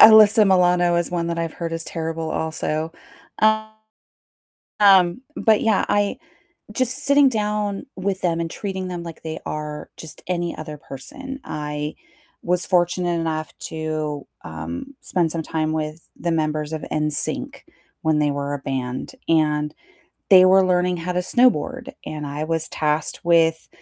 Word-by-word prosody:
Alyssa 220 0 +9
Milano 180 -2 +4
is 170 - -1
one 170 -1 -1
that 170 0 -2
I've 165 -1 -3
heard 165 -1 -4
is 165 0 -3
terrible, 165 -1 -3
also, 160 0 -2 0.5
um, 220 0 -1 1.3
but 220 -6 +3
yeah 220 -3 +3
I 205 -1 +1 0.6
just 255 +3 0
sitting 280 0 +6
down 210 -2 -1
with 190 0 -2
them 170 -2 +1
and 165 0 -2
treating 190 -2 -4
them 175 -1 -5
like 165 -1 -9
they 160 0 -5
are 150 0 -5
just 160 - -9
any 175 -1 -1
other 155 -1 -7
person, 265 - -8
I 150 0 -4 0.5
was 180 +1 +1
fortunate 175 -1 +1
enough 155 -1 -3
to, 155 -2 -3 0.2
um, 85 - -7
spend 170 -3 +2
some 165 -1 -2
time 155 0 -1
with 155 +1 -4
the 170 - -1
members 155 -1 -1
of 155 - -4
NSYNC 150 -1 -1 0.4
when 155 -1 +2
they 150 -1 +2
were 140 0 -3
a 145 - -3
band, 130 -2 -4
and 150 -2 +2 0.6
they 185 -2 +9
were 190 0 +6
learning 180 0 +2
how 180 +2 -3
to 180 - 0
snowboard, 250 +5 +2
and 150 -1 -5
I 145 +1 -4
was 160 0 -1
tasked 150 0 -1
with 165 -1 +3
165 Hz, 150 wpm, -22 LUFS, 155-190 Hz, 1.3 s, Alyssa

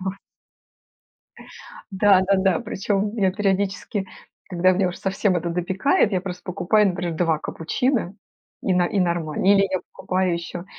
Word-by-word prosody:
Вот. 190 +1 -3 1.8
Да-да-да. 190 -2 +3
Причём 205 +2 -2
я 190 -4 +2
периодически, 195 0 -1 0.4
когда 185 0 +3
меня 185 0 +1
уж 180 - -6
совсем 195 -1 0
это 170 0 -2
допекает, 190 - +1
я 185 - +1
просто 180 -1 -7
покупаю, 200 +3 +2
например, 175 -2 -3
2 165 -2 +1
капучино- 200 - -2 0.5
и 185 - +1
но 180 - +3
и 200 - -1
нормально. 170 -2 -1
Или 195 0 +5
я 185 - 0
покупаю 185 -1 -1
еще 170 +1 -6
190 Hz, 140 wpm, -23 LUFS, 175-200 Hz, 1.8 s, Или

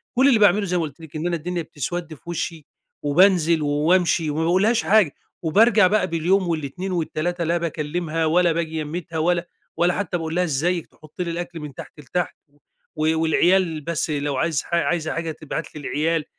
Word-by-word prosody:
كل 265 +3 +5
اللي 235 -6 +5
باعمله 205 0 +4
زي 180 -1 0
ما 165 - 0
قُلت 150 0 -7
لِك 160 -1 -12
إن 160 +3 -2
أنا 175 - 0
الدنيا 175 +2 -3
بتسود 160 +2 -5
في - - -14
وشّي، 165 -2 -4 0.4
وبانزل 170 +1 +4
وامشي 160 +2 +2
وما 155 +2 -1
باقولهاش 200 +7 +2
حاجة، 205 -8 +3 0.3
وبارجع 210 +4 +5
بقى 210 -1 +2
باليوم 175 +3 +1
وال2 165 +4 -3
وال3 175 +1 -2
لا 170 +1 +1
باكلمها 165 0 -2
ولا 170 +2 +3
باجي 160 -1 -2
يميتها 165 +2 -5
ولا 170 +1 +1 0.3
ولا 175 +1 +3
حتى 185 -3 -2
باقُول 165 0 -4
لها 180 - +2
إزيك، 170 +3 0
تحط 155 +3 -11
لي 170 -1 -2
الأكل 170 -1 -5
من 150 -2 -8
تحت 150 - -11
لتحت 170 +6 -3 0.6
و 155 +1 +1
والعيال 165 0 +2
بس 165 +1 -2
لو 145 -2 -1
عايز 160 -1 0
حا 170 - -1
عايزة 170 -2 0
حاجة 165 0 -3
تبعت 155 +1 -6
لي 150 - -7
العيال، 155 +2 0
165 Hz, 185 wpm, -22 LUFS, 155-180 Hz, 0.6 s, كل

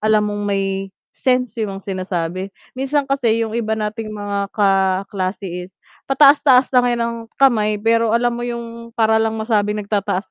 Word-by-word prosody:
alam 215 0 +3
mong 205 0 -3
may 195 -1 -1 0.3
sense 250 -1 +1
yung 195 -2 -4
sinasabi. 185 -1 -3 0.2
Minsan 275 +2 -1
kasi 245 -5 +1
yung 220 - -6
iba 220 -1 -1
nating 215 +1 -4
mga 200 -1 -3
kaklase 195 -1 0 0.2
is - - -36 0.4
pataas-taas 275 -2 +5
lang 250 -1 +4
yan 240 -1 0
ng 235 0 -2 0.2
kamay 215 -6 +2
pero 230 0 +2
alam 240 +1 +2
mo 240 0 -4
yung 235 -1 -7
para 220 -2 +3
lang 220 0 0
masabing 215 -2 0
nagtataas 200 -1 -2
220 Hz, 155 wpm, -19 LUFS, 200-235 Hz, 0.4 s, pataas-taas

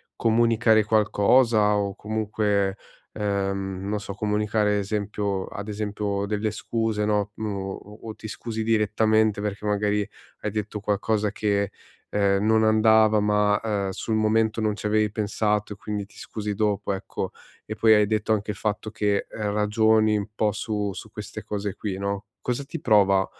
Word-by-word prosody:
comunicare 115 -1 +3
qualcosa, 110 +1 +3
o 100 -1 -1
comunque, 105 -2 0 0.4
ehm, 100 -2 -2
non 105 - -1
so, 100 -1 -6
comunicare 105 +1 0
ad - - +2
esempio 100 -1 -2
ad 100 +1 -7
esempio 105 -1 -2
delle 105 +1 -1
scuse 110 -1 -1
no, 105 -1 0
o 100 -3 -3 0.3
o 110 - -6
ti 110 - -9
scusi 110 0 -4
direttamente 110 -1 +2
perché 105 0 -4
magari 105 0 +1 0.3
hai 105 - -2
detto 105 0 -3
qualcosa 105 0 0
che 100 -1 0 0.4
ehm 100 0 +2
non 110 0 +4
andava 110 0 +5
ma, 105 0 +3
ehm, 100 -3 -1
sul 110 +3 -2
momento 110 +1 +2
non 105 -1 +1
ci 105 - -8
avevi 105 0 +2
pensato 105 0 -1
e - - -10
quindi 105 -1 -4
ti 105 - -21
scusi 105 -1 -4
dopo 105 -1 0
ecco 95 - -4 0.3
e 110 - -5
poi 110 0 +5
hai 105 -1 +4
detto 110 0 +1
anche 105 0 -1
il 105 - -8
fatto 105 0 -2
che 105 -2 0
ragioni 105 +1 +2
un 100 0 -3
po' 105 -1 +2
su 105 -1 -2
su - - -9
queste - - -7
cose 100 -2 -4
qui 100 -3 -4
no. 100 +1 -3 0.2
Cosa 125 +3 -2
ti 165 +3 -7
prova 100 -4 +4
105 Hz, 160 wpm, -25 LUFS, 100-110 Hz, 0.4 s, andava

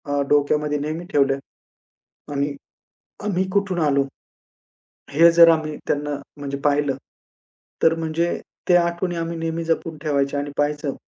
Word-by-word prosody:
अ, 140 - +2
डोक्यामध्ये 150 +1 +2
नेहमी 155 +4 -4
ठेवल्या. 135 -1 +3 1.0
आणि 140 0 -1 0.7
आम्ही 190 -2 +1
कुठून 200 -2 0
आलो? 140 -3 +3 1.1
हे 165 +4 +6
जर 170 0 +8
आम्ही 155 -2 0
त्यांना 145 0 -1 0.3
म्हणजे 140 -1 -4
पाहिलं, 145 -2 +2 0.9
तर 165 0 +5
म्हणजे 165 +1 -1 0.3
त्या 175 -1 +6
आठवणी 175 +1 -2
आम्ही 165 0 -3
नेहमी 165 0 -2
जपून 165 -1 -1
ठेवायच्या 140 -2 0
आणि 145 0 -4
पहायचं, 145 -1 0
155 Hz, 130 wpm, -22 LUFS, 145-165 Hz, 1.1 s, जर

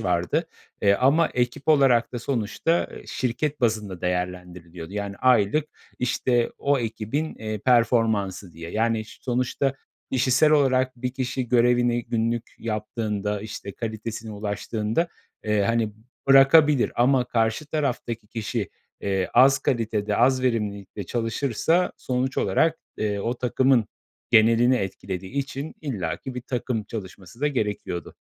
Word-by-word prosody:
vardı, 90 -1 0 0.4
eee, 100 -1 +5
ama 140 +9 +3
ekip 125 +3 -2
olarak 135 -6 +4
da 120 - -3
sonuçta 125 +7 0 0.2
şirket 140 +4 -2
bazında 105 -6 -1
değerlendiriliyordu. 90 -1 -4
Yani, 100 -1 -4
aylık, 125 +3 +3 0.3
işte, 125 -1 +1
o 140 -1 +2
ekibin, 115 +7 -3
eee, 110 -1 -5
performansı 110 -5 +2
diye. 85 +1 -8
Yani, 110 +1 0
ş - - -15
sonuçta 130 +2 0 0.4
kişisel 130 +4 +3
olarak 130 -3 +3
bir 125 +1 -3
kişi 130 -1 -2
görevini 120 0 +3
günlük 115 0 -2
yaptığında, 105 -2 -3
işte, 100 -2 -7
kalitesine 110 0 -5
ulaştığında, 105 - -2 0.4
eee, 105 -2 +2
hani, 115 0 +1 0.4
bırakabilir 135 0 +6
ama 125 +1 +3
karşı 115 +6 0
taraftaki 125 -7 -2
kişi, 115 0 -3 0.3
eee, 95 -2 -1
az 135 +1 +6
kalitede, 110 -4 -1
az 130 +1 +3
verimlilikte 105 -5 -2
çalışırsa 125 - 0
sonuç 130 +1 -2
olarak, 160 +12 +2 0.2
eee, 105 -1 -1
o 115 +4 -1
takımın 125 -2 +2 0.4
genelini 115 +3 +5
etkilediği 95 -2 -5
için 140 +2 -4
illaki 125 - -4
bir 125 - -4
takım 120 -3 -3
çalışması 95 0 -9
da 150 - +2
gerekiyordu. 105 - -3
115 Hz, 125 wpm, -24 LUFS, 105-130 Hz, 0.4 s, bırakabilir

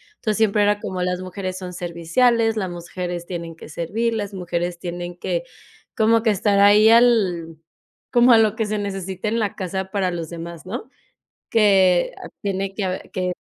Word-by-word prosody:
entonces 215 -2 -2
siempre 215 -1 +2
era 205 0 +2
como 185 -2 -4
las 180 0 -1
mujeres 185 0 -5
son 180 -1 -7
serviciales, 225 +7 +1
las 190 -3 -1
mujeres 175 0 -5
tienen 170 -2 -6
que 160 - -12
servir, 220 +9 -2
las 205 -2 -3
mujeres 175 -1 -3
tienen 175 0 -6
que, - - -2 0.5
como 225 -1 +3
que 225 - +3
estar 200 0 +2
ahí 205 +2 +7
al 195 -9 +3 0.5
como 245 -1 +5
a 230 - +8
lo 220 -1 +3
que 225 -3 -1
se 210 0 -2
necesita 195 0 -4
en 230 +2 0
la 210 -3 -1
casa 190 0 -4
para 195 -3 0
los 170 -2 -5
demás, 170 0 -8
¿no? 225 +5 -6 0.6
Que 190 -5 +4 0.3
tiene 195 -1 -2
que 200 - -2
a 185 0 -1
que. 180 -1 -3
190 Hz, 180 wpm, -22 LUFS, 175-215 Hz, 0.6 s, a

